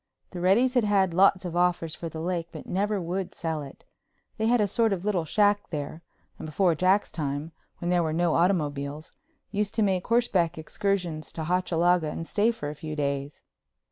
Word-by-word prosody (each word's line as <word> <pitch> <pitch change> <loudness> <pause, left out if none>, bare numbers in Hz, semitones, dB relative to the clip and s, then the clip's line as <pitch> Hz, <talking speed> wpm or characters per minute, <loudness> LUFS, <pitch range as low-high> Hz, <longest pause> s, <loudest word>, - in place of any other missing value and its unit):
The 180 - -6
Reddys 215 +9 +3
had 245 -3 +3
had 195 -4 +2
lots 190 +1 +4
of 175 -1 -4
offers 175 -2 +1
for 165 - -6
the 160 0 -6
lake 170 -1 -2
but - - -9
never 205 +2 0
would 180 +2 -3
sell 160 -2 -3
it. 140 -1 -11 0.5
They 220 - +1
had 240 +1 +4
a 210 - +3
sort 225 +1 +2
of 190 0 -4
little 185 -6 0
shack 205 +4 +2
there 150 +1 -5 0.4
and 160 - -6
before 175 +3 +2
Jack's 185 +5 +2
time, 145 0 -3 0.3
when 175 0 -2
there 175 -1 +3
were 160 -2 0
no 170 0 +1
automobiles, 150 -4 0 0.4
used 205 0 -1
to 220 - +2
make 190 -2 0
horseback 195 -8 +2
excursions 175 -2 -2
to 160 - -4
Hochalaga 175 -1 +2
and 165 +2 -5
stay 215 +2 +2
for 150 -11 -3
a - - -6
few 155 0 -6
days. 140 -1 -3
175 Hz, 195 wpm, -27 LUFS, 160-200 Hz, 0.5 s, lots